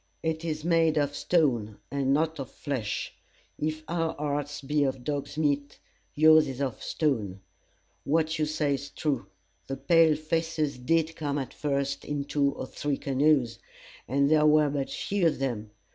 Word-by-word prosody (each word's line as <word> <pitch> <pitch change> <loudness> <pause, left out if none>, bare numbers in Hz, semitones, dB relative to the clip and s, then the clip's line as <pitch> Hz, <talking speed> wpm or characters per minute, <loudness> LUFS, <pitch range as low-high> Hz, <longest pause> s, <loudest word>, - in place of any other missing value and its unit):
It 160 0 -1
is 155 -2 -3
made 165 -2 +3
of 145 -1 +1
stone, 120 - +1
and 135 -1 0
not 160 +2 +1
of 135 - -5
flesh. 130 -8 -4 0.5
If 155 +1 -2
our 165 -1 -1
hearts 145 0 -3
be 145 +1 +1
of 130 -2 -2
dog's 145 +1 -3
meat, 145 -2 0 0.4
yours 155 +1 +6
is 130 -1 -6
of 135 -4 -2
stone. 110 - -1 0.6
What 160 +2 +1
you 155 - +1
say 150 -2 0
is 140 +1 -4
true. 135 -10 -2 0.4
The 135 - -4
pale 165 +1 +4
faces 155 -3 -1
did 160 +4 +1
come 145 -2 -2
at 135 -3 -4
first 140 -1 -2
in 145 -1 -3
two 140 -1 +1
or - - -5
three 145 +1 -3
canoes, 135 -3 +2 0.5
and 140 +3 +2
there 155 0 +4
were 150 -1 +4
but 140 -2 -2
few 195 -4 0
of 155 - 0
them. 120 -6 -3
145 Hz, 165 wpm, -28 LUFS, 140-155 Hz, 0.6 s, yours